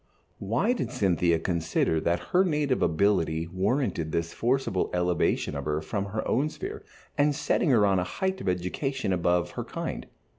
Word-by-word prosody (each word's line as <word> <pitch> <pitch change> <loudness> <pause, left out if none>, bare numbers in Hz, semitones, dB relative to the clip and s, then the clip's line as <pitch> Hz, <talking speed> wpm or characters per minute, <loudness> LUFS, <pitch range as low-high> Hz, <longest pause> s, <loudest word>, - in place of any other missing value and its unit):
Why 120 - +1
did 250 - -3
Cynthia 85 -3 +2
consider 80 -1 0
that 85 +1 -1
her 185 - +5
native 150 -7 0
ability 80 -2 +2
warranted 95 - -1
this 85 +1 -2
forcible 120 -6 0
elevation 90 -1 +1
of - - -4
her 75 0 0
from 100 +6 -3
her 110 +2 -3
own 140 +5 +1
sphere 415 - -7 0.4
and 145 0 +3
setting 150 +2 +1
her 115 -6 +5
on 95 -2 +3
a - - +1
height 190 - -2
of - - -1
education 95 +6 -1
above 90 -1 +1
her - - -4
kind? - - -5
95 Hz, 170 wpm, -27 LUFS, 85-135 Hz, 0.4 s, her